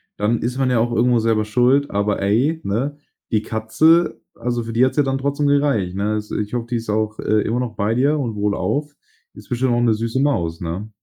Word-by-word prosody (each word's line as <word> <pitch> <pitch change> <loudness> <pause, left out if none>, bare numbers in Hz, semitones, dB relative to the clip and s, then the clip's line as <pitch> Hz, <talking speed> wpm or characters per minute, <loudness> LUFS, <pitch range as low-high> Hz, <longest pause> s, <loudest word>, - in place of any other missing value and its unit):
dann 110 +3 0
ist 125 +2 -2
man 135 -1 +1
ja 125 -2 +2
auch 120 +1 +1
irgendwo 120 +1 +3
selber 110 -1 +1
schuld. 125 +6 +2
Aber 100 0 0
ey, 125 +12 +1
ne, 130 +9 -2 0.3
die 110 - +2
Katze, 110 +11 +2
also 120 0 -2
für 115 - -6
die 120 +3 +4
hat's 130 - -2
ja 145 - +5
dann 135 0 -1
trotzdem 140 +2 -1
gereicht, 140 -11 +1
ne? 100 +2 -1
Also 105 0 -3
ich 105 +1 -3
hoffe, 120 -1 -2
die 120 - 0
ist 115 -1 -7
auch, 110 0 -1
äh, 110 0 +1
immer 115 +4 -1
noch 120 -3 -3
bei 105 +2 0
dir 140 +5 +2
und 120 -7 -3
wohlauf. 105 +8 -1 0.4
Ist - - -14
bestimmt 125 0 +1
auch 120 - +1
'ne 115 -2 +3
süße 115 +3 -2
Maus, 85 - 0
ne? 90 +5 -4
115 Hz, 230 wpm, -20 LUFS, 105-130 Hz, 0.4 s, ja